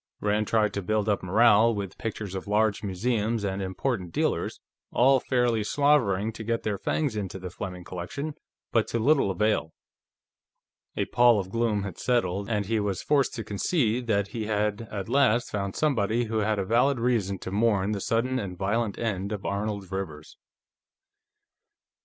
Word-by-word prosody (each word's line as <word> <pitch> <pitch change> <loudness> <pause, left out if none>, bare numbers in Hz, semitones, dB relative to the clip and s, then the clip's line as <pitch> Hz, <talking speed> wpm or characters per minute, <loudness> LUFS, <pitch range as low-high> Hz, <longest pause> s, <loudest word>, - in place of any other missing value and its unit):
Rand 105 0 0
tried 110 -2 +2
to 100 - -2
build 110 +2 0
up 105 -1 +1
morale 110 +4 +4
with 100 -2 -5
pictures 110 -3 -4
of 95 +1 -5
large 105 +1 +2
museums 110 +2 -1
and 100 -1 -2
important 95 0 -2
dealers, - - -1 0.3
all 130 +2 +5
fairly 120 -4 +1
slavering 115 -6 +2
to 110 - -7
get 115 +1 -1
their 105 -3 -2
fangs 145 -8 -1
into 95 -3 -4
the 90 -1 -7
Fleming 90 0 -6
collection, 95 - -5 0.4
but 115 -2 +2
to - - -2
little 135 -1 +3
avail. 100 -4 0 1.2
A - - +1
pall 120 -3 +4
of 95 -1 -5
gloom 115 -3 0
had 95 -4 -6
settled, 100 -5 0
and 105 -3 0
he 110 +2 0
was 100 -3 -2
forced 140 -3 +2
to 115 - -4
concede 115 - 0
that 100 -3 +1
he 110 -1 -4
had 105 +1 -1
at 100 -3 -5
last 120 -2 +2
found 100 -2 -3
somebody 120 -6 +1
who 110 -1 -1
had 110 0 +1
a 100 - -1
valid 125 +5 +2
reason 115 -5 0
to 95 - -7
mourn 105 -1 +2
the 100 -2 -2
sudden 125 +5 0
and 95 -5 -5
violent 105 +3 -1
end 100 -3 -2
of 105 -2 -5
Arnold 100 -1 -3
Rivers. 80 -6 -6
105 Hz, 170 wpm, -27 LUFS, 100-115 Hz, 1.2 s, all